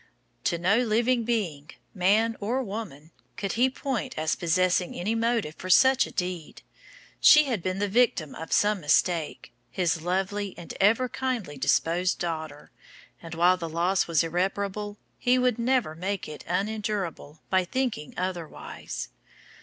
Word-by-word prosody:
To 170 - +1
no 190 +7 +3
living 235 +1 +1
being, 170 -11 -2 0.2
man 215 +5 +2
or 245 +6 -1
woman, 195 - -7 0.3
could 195 - -2
he 250 +3 +3
point 265 -2 -4
as 155 0 0
possessing 180 +1 +1
any 200 +6 -1
motive 230 -7 0
for 185 - -6
such 265 +7 +5
a - - -11
deed. 180 -3 -4 0.6
She 300 - +8
had 245 - -2
been 185 +1 -2
the 205 +1 0
victim 200 - +1
of 160 - -8
some 210 -2 +2
mistake, 160 +1 0 0.2
his 170 -3 0
lovely 190 +3 -2
and 170 - -8
ever 225 +6 +4
kindly 245 - -3
disposed 170 +6 +1
daughter, 160 -3 -5 0.5
and 165 0 -8
while 175 +2 +4
the 165 -2 -5
loss 175 +4 +1
was 165 -2 +2
irreparable 200 +4 -2 0.2
he 250 +1 +3
would 250 -2 +1
never 240 -8 +1
make 190 +4 -3
it 150 - -9
unendurable 195 -5 -3
by 185 -1 +3
thinking 235 - -3
otherwise. 170 - -5
190 Hz, 145 wpm, -27 LUFS, 170-225 Hz, 0.6 s, She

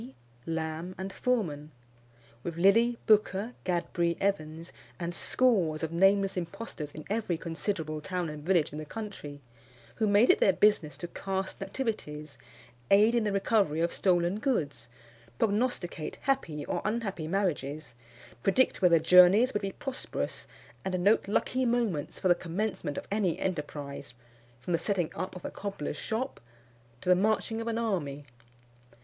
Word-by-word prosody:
Dee, 130 +2 -11 0.3
Lamb, 165 +2 -3
and 190 +1 -5
Forman; 170 - -1 0.7
with 170 +3 -5
Lilly, 230 +7 +4
Booker, 210 +1 +3
Gadbury, 170 -1 0
Evans, 165 -4 -2 0.3
and 170 0 -3
scores 175 -8 +1
of 160 - -2
nameless 195 +3 +3
impostors 170 -3 -5
in 155 - -9
every 205 -5 -1
considerable 160 -2 -3
town 180 +1 -2
and 150 -1 -7
village 170 -4 +2
in 150 - -5
the 155 - -6
country, 150 -7 -7 0.6
who 220 - +2
made 205 +4 +6
it - - +1
their 195 - +5
business 205 -8 +2
to 175 - -5
cast 190 +2 -4
nativities, 155 - -4 0.5
aid 210 +4 +6
in 235 -2 +2
the 205 - +1
recovery 195 -5 +2
of 170 +1 +1
stolen 180 +1 +2
goods, 165 - -1 0.5
prognosticate 205 - -1
happy 170 - -1
or - - -2
unhappy 210 -7 -2
marriages, 155 -7 -2 0.5
predict 215 - +2
whether 175 -3 +6
journeys 180 +9 +6
would 205 - 0
be 195 -1 -2
prosperous, 270 -2 -5 0.4
and 185 -2 -1
note 205 +1 +4
lucky 255 +5 +1
moments 230 - 0
for - - 0
the 175 - +7
commencement 175 -3 -3
of - - -5
any 200 -5 +1
enterprise, 145 -7 -4 0.4
from 170 +8 -3
the 165 - +2
setting 180 -4 0
up 185 - -5
of 180 - -9
a - - -4
cobbler's 195 -8 -4
shop 250 +5 -3 0.6
to - - -11
the 180 - +7
marching 220 +3 +1
of 230 - -5
an 230 -1 -1
army. 155 -11 -2
185 Hz, 150 wpm, -29 LUFS, 160-210 Hz, 0.7 s, the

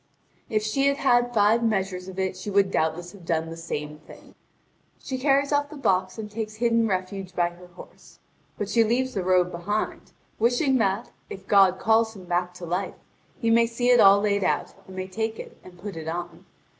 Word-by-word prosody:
If 215 -2 0
she 275 +6 +1
had 280 0 +2
had 245 -3 +3
five 220 +1 +3
measures 190 -4 -1
of 190 0 -9
it 190 -1 -1
she 185 +3 -7
would 200 -1 +2
doubtless 165 +2 -1
have 200 -4 -15
done 165 -1 -1
the - - -6
same 150 -2 -5
thing. 155 - -16 0.6
She 260 -1 -5
carries 280 +1 +2
off 290 0 +1
the 305 - -10
box, 185 -7 0
and 220 -1 -5
takes 215 0 -5
hidden 230 0 +2
refuge 185 -1 -4
by 175 -1 +2
her 180 +1 -15
horse. 175 0 -15 0.4
But 205 - -3
she 230 +3 +3
leaves 255 +4 0
the 195 - -1
robe 180 -1 +2
behind, 195 +5 -3 0.3
wishing 250 +4 +2
that, 200 +2 0 0.2
if 195 0 -9
God 195 -2 +5
calls 225 +2 +2
him 185 -2 -11
back 175 0 -1
to 180 - -8
life, 180 +3 -3 0.4
he 230 -1 +1
may 230 0 +5
see 245 +2 +1
it 245 - +6
all 200 0 +7
laid 205 -1 +1
out, - - -1
and 190 - -11
may 185 0 -4
take 220 +3 -3
it - - -9
and 180 -1 -14
put 195 +1 -7
it 160 -1 -7
on. 175 +1 -5
200 Hz, 205 wpm, -25 LUFS, 180-230 Hz, 0.6 s, all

